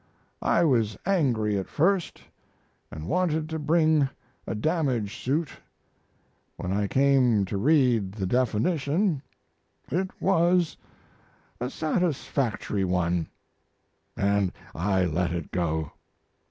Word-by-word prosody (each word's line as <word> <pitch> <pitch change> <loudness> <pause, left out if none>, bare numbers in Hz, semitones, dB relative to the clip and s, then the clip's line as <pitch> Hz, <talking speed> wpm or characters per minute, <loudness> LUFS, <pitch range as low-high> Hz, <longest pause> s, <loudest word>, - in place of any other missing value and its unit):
I 170 - +3
was 115 - +2
angry 120 - +1
at 95 - -6
first, 180 +3 0 0.7
and 80 +1 -7
wanted 160 - 0
to 160 0 -3
bring 155 -2 +3 0.4
a 95 - -2
damage 125 - 0
suit. 150 +4 0 1.1
When 90 - -4
I 100 0 0
came 130 -5 +3
to 95 - -5
read 125 -7 +3
the 100 -3 -3
definition 140 - +1 0.7
it 185 +5 0
was 175 -2 +2 0.8
a 125 - -2
satisfactory 140 - -1
one, 90 -2 0 0.9
and 100 -1 +1 0.2
I 95 +2 +1
let 85 +1 0
it 85 -4 -5
go. 80 -4 -1
125 Hz, 105 wpm, -26 LUFS, 100-160 Hz, 1.1 s, I